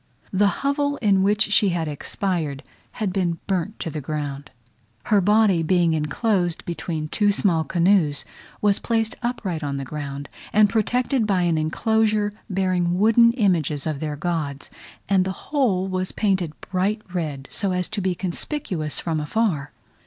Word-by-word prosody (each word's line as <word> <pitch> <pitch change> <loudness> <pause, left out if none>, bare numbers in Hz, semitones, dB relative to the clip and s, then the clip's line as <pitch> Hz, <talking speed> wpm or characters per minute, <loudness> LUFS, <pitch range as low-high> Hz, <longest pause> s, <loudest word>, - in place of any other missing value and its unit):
The 200 +2 +4 0.2
hovel 285 0 +1
in 200 -4 +3
which 210 +2 +2
she 205 -1 +4
had 170 -3 -1
expired 150 -1 -2 0.3
had 205 -4 -2
been 175 -4 0
burnt 195 +2 -2
to 165 - -3
the 155 - -4
ground: 145 -1 -4 0.5
her 205 -2 +3
body 205 -2 +4
being 170 0 +2
enclosed 175 +4 0
between 165 -2 -3
two 205 +5 +2
small 180 -5 +1
canoes, 170 -4 +2 0.4
was 205 -1 +3
placed 225 0 0
upright 200 -10 -3
on 140 -1 -2
the 135 - -4
ground, 140 0 -6 0.3
and 210 -1 +5
protected 245 +2 +1
by 190 -3 +2
an 165 -2 +2
enclosure 215 +5 +1 0.2
bearing 185 -2 +1
wooden 230 +3 +5
images 170 - +1
of 155 -3 -2
their 150 -1 -3
gods, 150 -3 -3 0.4
and 195 -2 +3
the 190 +7 -7
whole 205 -10 +2
was 185 0 -2
painted 190 -7 -1
bright 200 +3 -1
red, 150 -6 -3
so 200 -3 0
as 180 -1 -1
to 215 -2 -3
be 185 -1 0
conspicuous 180 - -2
from 160 -2 -1
afar. 150 -3 -1
185 Hz, 155 wpm, -23 LUFS, 155-210 Hz, 0.5 s, and